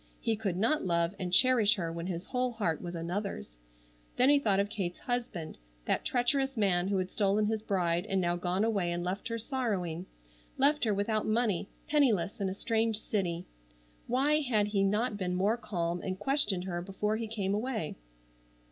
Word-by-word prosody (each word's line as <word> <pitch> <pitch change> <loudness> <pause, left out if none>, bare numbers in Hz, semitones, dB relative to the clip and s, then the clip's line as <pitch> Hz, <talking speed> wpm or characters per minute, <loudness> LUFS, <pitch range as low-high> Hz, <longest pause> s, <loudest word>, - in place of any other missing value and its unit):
He 225 -1 0
could 200 -5 -2
not 230 +10 +2
love 170 0 +1
and 180 -1 -3
cherish 230 +1 +5
her 170 -5 -3
when 170 +1 -5
his 180 0 -4
whole 250 +1 -1
heart 200 -9 -1
was 175 -1 -5
another's. 170 - -4 0.6
Then 255 +2 +5
he 290 0 +6
thought 205 -7 +2
of 200 - +2
Kate's 195 -4 -3
husband, 235 - -3 0.3
that - - 0
treacherous 270 +1 +1
man 185 -4 +2
who 200 0 +1
had 185 0 -2
stolen 205 0 +2
his 220 0 -1
bride 175 -5 0
and 195 - +1
now 175 -1 +1
gone 180 +3 0
away 200 -6 +1
and 175 0 -2
left 185 +3 -3
her 230 0 -2
sorrowing—left 200 - -2
her 215 - +2
without 215 +2 0
money, 215 -4 +1 0.2
penniless 220 - +2
in 195 - +1
a 190 - -4
strange 225 0 +1
city. 180 -6 -2 0.6
Why 280 +5 +3
had 215 -7 +1
he 205 -2 +1
not 210 +3 +1
been 180 -2 -2
more 200 +5 +2
calm 175 -6 -2
and 185 -1 -3
questioned 205 -5 +1
her 175 -2 -3
before 205 +4 -1
he 225 0 -3
came 200 -3 -2
away. 220 -6 -2
200 Hz, 185 wpm, -31 LUFS, 180-230 Hz, 0.6 s, he